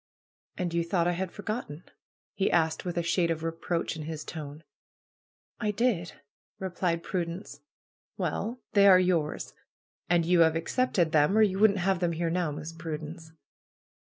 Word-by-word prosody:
"And 175 -2 -2
you 170 0 +1
thought 170 0 +1
I - - +3
had 180 0 -3
forgotten?" 205 -7 -5 0.5
he 195 - +1
asked, 160 0 +1
with 175 -1 -3
a 170 - +1
shade 170 0 +1
of 165 -1 -2
reproach 165 +1 -2
in 160 - -6
his 155 -1 -5
tone. 150 -1 -7 1.0
"I 210 - 0
did 205 -5 0 0.2
!" - - -
replied 180 -2 -1
Prudence. 170 -4 -4 0.6
"Well, 230 +5 -2
they 200 -1 +6
are 185 -2 +8
yours. 175 -5 0 0.6
And 175 -1 +3
you 175 +1 +3
have 160 -1 +5
accepted 170 -1 +1
them, 155 +6 +4
or 220 - +7
you 195 -2 +1
wouldn't 205 -1 +5
have 190 0 +1
them 175 -1 0
here 165 0 -1
now. 175 -2 0
Miss 150 +2 -6
Prudence." 160 0 -7
170 Hz, 165 wpm, -28 LUFS, 165-190 Hz, 1.0 s, are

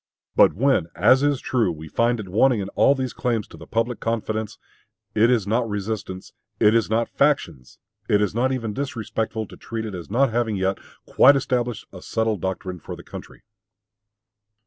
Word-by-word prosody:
But - - +6
when, 130 -6 +2
as 130 +1 +5
is 145 -2 +1
true, 115 -10 0
we 80 -1 -8
find 115 +7 +1
it 105 - -6
wanting 115 +5 +3
in 95 -1 -4
all 140 - +3
these 130 -2 -3
claims 115 -5 -1
to - - -12
the - - -12
public 115 +1 -1
confidence, 110 -1 -3 0.6
it 110 +2 +4
is 120 -6 +2
not 115 +3 0
resistance, 105 -2 -5 0.3
it 105 - +5
is 115 -2 +2
not 115 +1 +1
factions, 85 - -1 0.3
it 105 - +4
is 105 -2 0
not 125 +4 +1
even 115 -5 -3
disrespectful, 110 -3 -3
to - - -13
treat 115 -1 -5
it 105 - -6
as 90 -2 -8
not 125 +4 +2
having 115 -2 0
yet 95 0 -1 0.3
quite 140 +2 +6
established 125 -3 -1
a 90 - -10
settled 110 -3 -1
doctrine 95 -1 -4
for - - -8
the - - -12
country. - - -11
110 Hz, 185 wpm, -23 LUFS, 100-125 Hz, 0.6 s, But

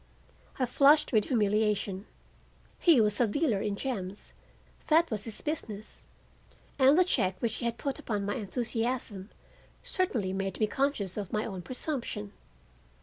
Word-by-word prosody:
I 255 - +1
flushed 280 +4 +4
with 215 -2 +4
humiliation. 210 -3 0 0.7
He 330 -7 +6
was 210 +1 +2
a 240 - +4
dealer 220 -3 +1
in 205 -1 -1
gems—that 250 - -2
was 210 -2 -2
his 225 -2 -5
business—and 265 +2 -2
the 365 - +7
check 185 - 0
which 225 -2 -1
he - - -4
had 235 0 -1
put 275 -2 -3
upon 205 -3 -2
my 205 - -1
enthusiasm 225 -1 -2 0.5
certainly 235 - -1
made 195 -1 -3
me 215 - +4
conscious 220 -6 -1
of 200 -3 -4
my 215 0 0
own 190 -4 -5
presumption. 250 - -4
220 Hz, 140 wpm, -30 LUFS, 200-265 Hz, 0.7 s, the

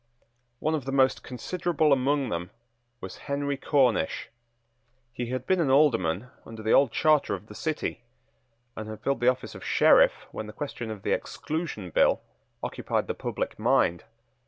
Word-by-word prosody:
One 155 +5 -1
of 150 -5 -2
the 135 - -3
most 135 -1 +3
considerable 160 +3 0
among 135 0 +1
them 85 -1 -3 0.5
was 95 - -7
Henry 140 0 -1
Cornish. 135 - +1 0.8
He 125 -1 -4
had 130 +1 -3
been 190 -1 +2
an 150 - +1
Alderman 125 - +3
under 110 -1 -10
the 110 - +1
old 135 -4 +5
charter 155 -8 +3
of 95 +2 -10
the 105 - -12
City, 155 -2 -3 0.7
and 110 0 -6
had 110 - -8
filled 140 - 0
the 120 - +1
office 130 0 -3
of - - -10
Sheriff - - +4
when 110 - -6
the 105 - -9
question 130 -5 -5
of 105 -3 -7
the - - -1
Exclusion 150 - -3
Bill - - +4 0.4
occupied - - -2
the - - -2
public - - -4
mind. 85 0 +2
130 Hz, 165 wpm, -27 LUFS, 110-145 Hz, 0.8 s, old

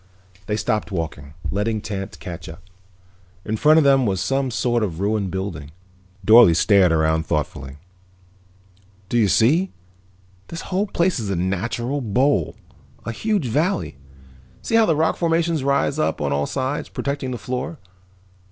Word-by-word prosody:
They 105 - 0
stopped 110 -1 -1
walking, 75 -5 -5 0.2
letting 105 +2 -1
Tance 100 0 -6
catch 85 -3 -8
up. 80 +1 -11 0.8
In 110 - -1
front 155 +7 +5
of 160 - +5
them 135 -3 +4
was 95 -2 0
some 135 +5 0
sort 120 0 0
of 90 -6 -3
a - - -2
ruined 105 -2 0
building. 90 -6 -5 0.6
Dorle 110 -5 +8
stared 95 0 +4
around 80 0 +1
thoughtfully. 70 -3 -3 1.3
"Do 120 - 0
you 110 - +4
see? 150 - +3 0.8
This 165 - -6
whole 195 +3 -1
place 170 -5 0
is 105 -3 -4
a 100 - 0
natural 120 +10 -2
bowl, 120 - +1 0.5
a 115 - -3
huge 205 - -1
valley. 155 - -1 0.7
See - - -4
how 225 -1 +5
the 160 - +3
rock 160 +2 +1
formations 165 -3 +1
rise 140 +1 +1
up - - 0
on 70 -1 -1
all 70 0 0
sides, 135 +2 -3
protecting 140 -2 -3
the 125 - -3
floor. 130 +7 -4
115 Hz, 155 wpm, -22 LUFS, 95-145 Hz, 1.3 s, Dorle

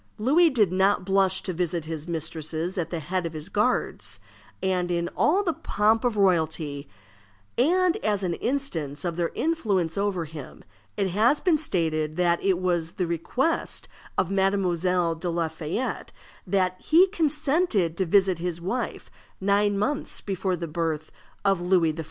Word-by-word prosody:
Louis 300 +10 +4
did 215 - +2
not 190 +1 +2
blush 190 -1 +2
to 185 - -3
visit 170 -1 -2
his 160 0 -6
mistresses 160 +1 -3
at 175 -4 -2
the 170 - -3
head 180 +2 -2
of 165 - -8
his 155 +3 -7
guards, 195 - 0 0.4
and 180 -1 0
in 170 0 -1
all 375 +7 +3
the 335 -4 0
pomp 220 -2 +1
of 240 -4 0
royalty; 160 -6 +1 0.7
and, 355 +7 +3
as 205 -2 -1
an 175 -2 0
instance 170 - -2
of 170 -1 -1
their 170 -1 0
influence 200 - 0
over 195 -4 0
him, 155 -2 -10 0.3
it 195 -2 +1
has 220 +10 +3
been 335 -5 +2
stated 160 - 0
that 175 -1 +2
it 190 -2 +3
was 175 -3 0
at - - -24
the 180 - +1
request 210 - -1 0.3
of 185 - +1
Mademoiselle 185 -3 +1
de 165 +2 -4
la 170 -1 0
Fayette 160 +10 -4 0.4
that 185 -2 0
he 335 +4 +6
consented 300 - +1
to 190 - 0
visit 190 -1 +3
his 175 -1 -3
wife 210 +9 -4 0.3
nine 200 +1 +2
months 270 +8 -1
before 190 -1 -2
the 170 -1 -5
birth 160 -1 -2 0.3
of 195 -3 +3
Louis 175 -3 +3
XIV. 160 - -10
185 Hz, 165 wpm, -26 LUFS, 165-210 Hz, 0.7 s, he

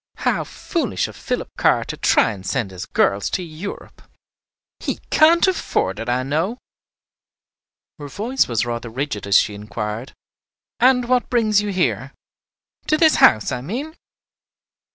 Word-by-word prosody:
"How - - +2
foolish - - -2
of - - -11
Philip - - -3
Carr - - +3
to - - -5
try 115 - +2
to 95 - -12
send 95 +1 -2
his 90 -1 -7
girls 100 0 +1
to 185 - -2
Europe! 170 +4 -8 0.8
He - - -3
can't 330 +2 +5
afford 225 - -1
it, 115 +2 -4
I 125 +1 +1
know." 160 - -1 1.4
Her 145 - -7
voice 230 - 0
was 115 -1 0
rather 120 0 -4
rigid 115 -4 -4
as 100 - +6
she 105 - +2
inquired, 105 +3 -5 0.7
"And 250 -1 +4
what 250 0 +1
brings 215 -4 +3
you 210 - -3
here? 185 -2 -1 0.7
to 310 - +3
this 315 -1 +4
house, 110 -2 +5
I 125 - -3
mean?" 260 - -5
150 Hz, 150 wpm, -21 LUFS, -, 1.4 s, as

